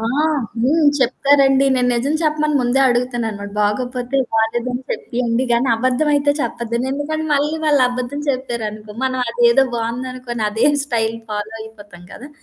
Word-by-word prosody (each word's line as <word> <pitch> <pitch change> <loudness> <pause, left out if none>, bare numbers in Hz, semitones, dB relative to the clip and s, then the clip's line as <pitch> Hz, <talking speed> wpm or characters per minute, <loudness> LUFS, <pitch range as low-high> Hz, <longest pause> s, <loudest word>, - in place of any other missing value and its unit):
ఆ! - - -4 0.6
హ్మ్. 310 +4 +3
చెప్తారండి. 270 +1 +3
నేను 250 -1 +1
నిజం 270 +6 0
చెప్పమని 305 -1 +1
ముందే 245 +2 +1
అడుగుతాననమాట. 235 -4 -2
బాగోపోతే 245 +5 -1 0.2
బాలేదని 240 +3 0
చెప్పియండి 240 +1 -1
గానీ 240 +3 +2
అబద్ధం 255 +6 0
అయితే 285 0 +2
చెప్పద్దు. 235 -2 -3 0.2
ఎందుకని 310 +2 -3
మళ్ళీ 295 +2 +1
వాళ్ళు 290 -3 +4
అబద్ధం 250 +3 -4
చెప్పారనుకో. 220 -5 -5
మనం 255 0 -1
అదేదో 240 +3 +4
బాగుందనుకోని 240 0 -4
అదేం 225 +8 +2
స్టైల్ 230 -4 -1
ఫాలో 210 +1 -4
అయిపోతాం 205 -5 -12
కదా! 275 - -10
245 Hz, 135 wpm, -19 LUFS, 230-275 Hz, 0.6 s, వాళ్ళు